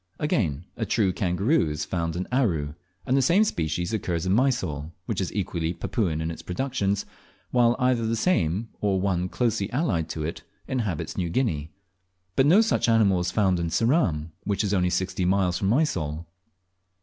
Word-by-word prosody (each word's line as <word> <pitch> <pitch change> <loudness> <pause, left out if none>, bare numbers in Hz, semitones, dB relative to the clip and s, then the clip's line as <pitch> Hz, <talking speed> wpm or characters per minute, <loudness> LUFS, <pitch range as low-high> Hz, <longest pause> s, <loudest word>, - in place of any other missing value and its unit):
Again, 90 - 0
a 115 - -1
true 105 -4 +1
kangaroo 95 - +1
is 75 0 -3
found 85 -2 -2
in 90 +1 -3
Aru, 85 - +1 0.3
and 130 - +1
the 135 - +4
same 175 - +4
species 85 - -1
occurs 90 -5 -1
in 95 - +2
Mysol, 95 - 0
which 105 -4 -2
is 95 - -2
equally 85 -4 -2
Papuan 85 -4 -1
in 80 +1 -2
its 80 - -8
productions, 100 -1 -1 0.5
while 120 -1 +4
either 125 -3 +1
the 115 - 0
same, 110 - +1
or 100 -2 +1
one 90 -2 0
closely 110 -4 0
allied 110 - 0
to 80 - -4
it, 80 - -4 0.3
inhabits 110 - -2
New 85 -2 -1
Guinea; 85 - -1 0.7
but 135 - +4
no 185 +8 +7
such 220 - +1
animal 105 -5 +4
is 90 0 -1
found 95 -2 +2
in 85 - -1
Ceram, 85 - +1
which 100 0 0
is 105 -1 0
only 90 -2 +2
sixty 95 +1 -1
miles 90 -1 +2
from 95 - 0
Mysol. 85 - 0
95 Hz, 175 wpm, -25 LUFS, 85-115 Hz, 0.7 s, no